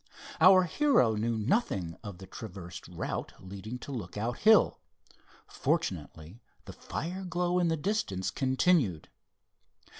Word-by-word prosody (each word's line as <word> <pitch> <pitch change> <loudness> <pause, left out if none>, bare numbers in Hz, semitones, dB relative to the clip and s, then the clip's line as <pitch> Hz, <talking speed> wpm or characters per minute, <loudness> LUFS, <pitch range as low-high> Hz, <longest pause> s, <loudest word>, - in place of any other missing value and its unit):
Our 185 +2 +8
hero 180 - +3
knew 115 +2 -1
nothing 105 - 0
of 100 -4 -7
the 95 - -10
traversed 90 -4 -9
route 90 -1 -5
leading 100 +5 -7
to 145 - -8
Lookout 110 0 -4
Hill. 220 0 +5 0.7
Fortunately 80 +9 -3 0.2
the - - -9
fire 180 +5 -5
glow 180 0 0
in 175 - +2
the 165 -1 +1
distance 145 - -1
continued. 130 - +1
120 Hz, 120 wpm, -30 LUFS, -, 0.7 s, Our